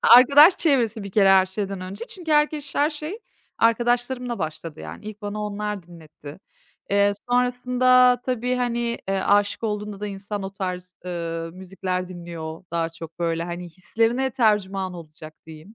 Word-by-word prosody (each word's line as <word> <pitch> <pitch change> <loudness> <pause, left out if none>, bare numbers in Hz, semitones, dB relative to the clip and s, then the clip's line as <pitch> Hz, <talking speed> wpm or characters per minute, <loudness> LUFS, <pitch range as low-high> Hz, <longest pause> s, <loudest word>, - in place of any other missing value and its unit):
Arkadaş 280 +8 +8
çevresi 240 -8 +2
bir 200 - -7
kere 195 0 +4
her 190 -1 +6
şeyden 195 0 -4
önce 195 +5 -6
çünkü 335 -1 -4
herkeş 300 -1 +1
her 295 +2 +2
şey 310 +7 -6 0.4
arkadaşlarımla 240 +1 +1
başladı, 155 -1 -5
yani. - - -9
İlk 215 0 -9
bana 205 +1 -4
onlar 210 -1 -3
dinletti. 155 -3 -13 0.5
Eee, 200 0 +4 0.2
sonrasında 250 0 +4
tabii, 250 0 -1
hani, 240 -1 -1
eee, 195 0 +1
âşık 205 +1 +2
olduğunda 210 -2 -3
da 210 - -3
insan 200 0 -5
o 195 - -5
tarz, 180 -2 -5
ııı, 165 -2 -4
müzikler 185 0 -4
dinliyor 170 -2 -8
daha 165 -1 0
çok, 165 0 -11
böyle. 165 -1 -1
Hani, 175 +1 -5
hislerine 225 +9 0
tercüman 200 -6 +1
olacak, 155 -2 -11
diyeyim. 160 +6 -12
205 Hz, 150 wpm, -23 LUFS, 180-245 Hz, 0.5 s, Arkadaş